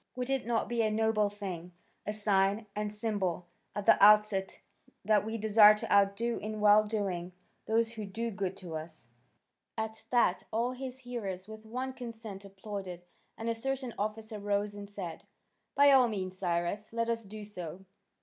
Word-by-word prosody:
Would 250 +1 -3
it 270 -4 -1
not 235 -1 +1
be 235 -1 0
a 220 - +2
noble 215 -1 +2
thing, 185 -4 -7 0.3
a - - +1
sign 205 0 +1
and 210 0 -2
symbol 205 -5 -2 0.3
at 205 - -3
the - - +6
outset 210 -2 +5 0.5
that 215 -1 +4
we 220 +1 -3
desire 215 0 +7
to - - -2
outdo 200 +4 +3
in 215 +1 -5
well 210 0 +6
doing 190 -5 -2 0.3
those 225 +1 +2
who 220 -2 -6
do 230 +4 -3
good 195 -2 -3
to 175 -4 -7
us?" 155 -4 -8 0.7
At 220 0 -4
that 240 -7 +3
all 235 +3 0
his 260 0 -7
hearers 205 -7 -5
with 220 0 -11
one 255 +3 -3
consent 225 -5 -8
applauded, 195 -2 -7 0.3
and 225 - -5
a 230 - +2
certain 260 +1 -3
officer 215 +1 -3
rose 205 0 -1
and 205 0 -8
said: 185 -5 -6 0.5
"By 285 0 +7
all 260 -2 +7
means, 190 -4 -4
Cyrus, 180 +3 -2
let 230 0 0
us 230 -1 -1
do 210 +1 -9
so. 185 -2 -8
210 Hz, 170 wpm, -31 LUFS, 195-225 Hz, 0.7 s, desire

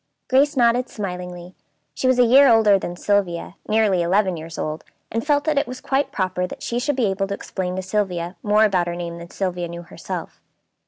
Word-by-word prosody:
Grace 280 +3 +3
nodded 245 +1 +3
smilingly. 180 -3 -6 0.4
She 260 - -1
was 255 -1 +3
a 250 - +6
year 270 +4 +7
older 220 -4 +5
than 175 -1 -5
Sylvia, 180 -3 0 0.2
nearly 210 -4 +3
eleven 185 +2 +2
years 160 0 -8
old, 155 +1 -4 0.3
and 230 0 -1
felt 290 -1 +2
that 300 -2 +2
it - - -2
was 255 0 -7
quite 275 +1 -1
proper 185 -1 -1
that - - -9
she 240 - -1
should 285 +3 0
be 250 -3 +1
able 195 0 -1
to 200 - -3
explain 185 -2 -4
to 190 - -3
Sylvia 185 -3 -2
more 210 +1 +3
about 185 -4 +1
her 170 - -3
name 170 -1 -5
than 170 0 -10
Sylvia 180 -2 -3
knew 170 0 -8
herself. - - -7
195 Hz, 210 wpm, -22 LUFS, 175-235 Hz, 0.4 s, year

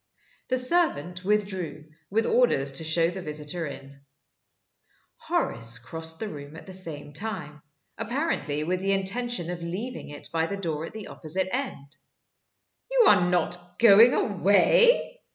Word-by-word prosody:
The 255 - 0
servant 250 - +2
withdrew, 190 -7 -2 0.2
with 225 +3 +1
orders 235 - +2
to 135 +4 +1
show 165 +1 +2
the 190 +1 -7
visitor 150 +1 -4
in. 140 0 -10 1.2
Horace 115 0 0
crossed 160 +7 -3
the 220 - -3
room 145 -3 -9
at 165 - -11
the 190 - -10
same 160 -6 -5
time 150 -6 -6 0.4
apparently 230 - -2
with 180 +3 -1
the 195 +1 0
intention 195 -1 -1
of 175 -1 -6
leaving 190 +9 -6
it 145 0 -9
by 165 0 +1
the 200 - -4
door 165 -5 -3
at - - -12
the 220 -1 -8
opposite 185 +6 -3
end. 155 - -6 0.9
"You - - +4
are - - +6
not 180 0 0 0.2
going 230 +2 +7
away?" 365 - +3
180 Hz, 145 wpm, -26 LUFS, 155-220 Hz, 1.2 s, going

